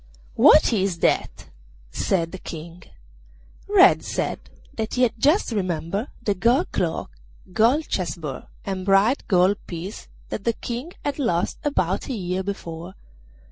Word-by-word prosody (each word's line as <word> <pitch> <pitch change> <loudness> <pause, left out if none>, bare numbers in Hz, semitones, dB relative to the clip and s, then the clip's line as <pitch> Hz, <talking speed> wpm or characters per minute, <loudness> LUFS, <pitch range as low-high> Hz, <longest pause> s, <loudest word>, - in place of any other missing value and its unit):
'What - - +6
is 195 -4 0
that?' - - 0 0.5
said 165 -3 0
the 190 - -7
King. 170 +2 -9 0.9
Red - - +6
said - - -2 0.3
that 220 0 -3
he 250 - +2
had 240 -2 +3
just 300 - +3
remembered 190 - -2 0.2
the 205 - +1
gold 235 +7 +2
cloak, 170 -3 -2 0.4
gold 245 +9 +3
chess 175 -6 -2
board, 150 -5 -6 0.2
and 190 -1 -3
bright 200 +7 +3
gold 190 0 +4
piece 180 +4 -7 0.2
that 205 - -4
the 235 - +1
King 245 +10 -6
had 285 0 -2
lost 175 -10 0
about 190 - -1
a - - -1
year 185 -3 -2
before. 180 -2 -6
195 Hz, 140 wpm, -23 LUFS, 175-235 Hz, 0.9 s, What